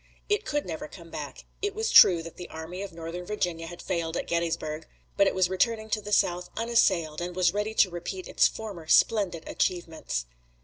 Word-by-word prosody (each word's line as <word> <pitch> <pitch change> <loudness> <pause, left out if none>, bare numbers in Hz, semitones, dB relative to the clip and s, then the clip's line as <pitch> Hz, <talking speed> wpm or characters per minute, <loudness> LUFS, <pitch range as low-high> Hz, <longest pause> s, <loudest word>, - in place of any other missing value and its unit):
It 415 0 +1
could 295 -1 -1
never 160 -3 -5
come 165 0 -13
back. - - -7 0.2
It 410 0 -2
was 445 +1 -1
true 170 -3 +8
that 165 - -9
the 180 - -9
Army 160 +4 -7
of 200 -1 -6
Northern 165 +2 -6
Virginia 175 -4 -2
had 175 +1 -9
failed 170 -2 -2
at - - -2
Gettysburg, 160 -2 -2 0.3
but 200 -1 +4
it - - 0
was 185 -1 +3
returning 220 +4 0
to 215 - 0
the 210 - -8
South 180 -3 +2
unassailed, 190 -9 +2
and 175 0 -4
was 180 -1 +3
ready 210 +2 -2
to 190 - +4
repeat 175 +2 -5
its - - +4
former 200 -8 -7
splendid 190 -4 +3
achievements. 165 - -2
180 Hz, 195 wpm, -27 LUFS, 165-210 Hz, 0.3 s, true